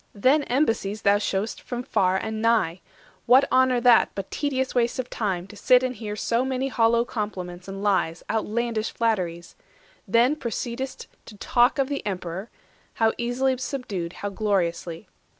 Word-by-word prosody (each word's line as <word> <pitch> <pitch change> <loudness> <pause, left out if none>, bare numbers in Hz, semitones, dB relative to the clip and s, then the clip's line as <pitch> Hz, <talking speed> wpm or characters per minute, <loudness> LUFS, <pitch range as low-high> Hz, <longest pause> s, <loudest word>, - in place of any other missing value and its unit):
Then 260 +9 +4
embassies 225 -6 0
thou 200 0 +5
shew'st 205 +1 -2
From 245 -1 -5
nations 250 - -17
far 185 0 +3
and 220 +2 -4
nigh! 220 -7 +2 0.5
What 260 +3 +7
honour 255 -1 +4
that, 245 -1 +6
But 195 -1 -6
tedious 265 -3 -1
waste 240 -1 +1
of 255 -1 -4
time, 190 -5 -2
to 205 - -13
sit 250 +4 +4
and 255 0 -1
hear 210 -3 -5
So 230 +3 0
many 265 0 -1
hollow 235 -1 +3
compliments 185 -6 -5
and 195 +1 -6
lies, 185 -5 +1
Outlandish 225 0 -1
flatteries? 180 -7 -2 0.5
Then 245 +5 +4
proceed'st 245 +1 -4 0.2
to 210 - -11
talk 245 +6 +3
Of 275 -1 +1
the 285 0 -3
Emperor, 190 +1 -4 0.5
how 225 -1 +2
easily 250 +2 +1
subdued, 205 - -4
How 205 - -5
gloriously. 185 -4 -2
225 Hz, 160 wpm, -25 LUFS, 195-250 Hz, 0.5 s, What